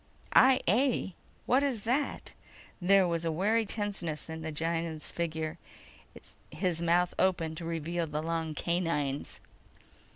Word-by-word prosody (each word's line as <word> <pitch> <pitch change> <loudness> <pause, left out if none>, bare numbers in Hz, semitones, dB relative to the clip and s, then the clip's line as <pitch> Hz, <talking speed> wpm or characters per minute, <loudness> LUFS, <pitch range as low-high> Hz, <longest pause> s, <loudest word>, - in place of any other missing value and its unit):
"I 260 0 +7
A? 230 -1 +2 0.3
What 255 +3 +4
is 260 -7 -1
that?" 260 +5 -1 0.5
There 190 +1 +5
was 170 -1 -1
a 165 - 0
wary 210 +7 +1
tenseness 195 -8 -3
in 160 0 -6
the 160 0 -4
Gienahn's 165 0 -2
figure. 160 -2 -3 0.9
His 170 +2 -1
mouth 175 +1 +2
opened 165 -4 +1
to 170 - -6
reveal 165 +1 -2
the 150 +1 -3
long 165 -1 -2
canines. 165 -6 -1
170 Hz, 130 wpm, -30 LUFS, 160-195 Hz, 0.9 s, I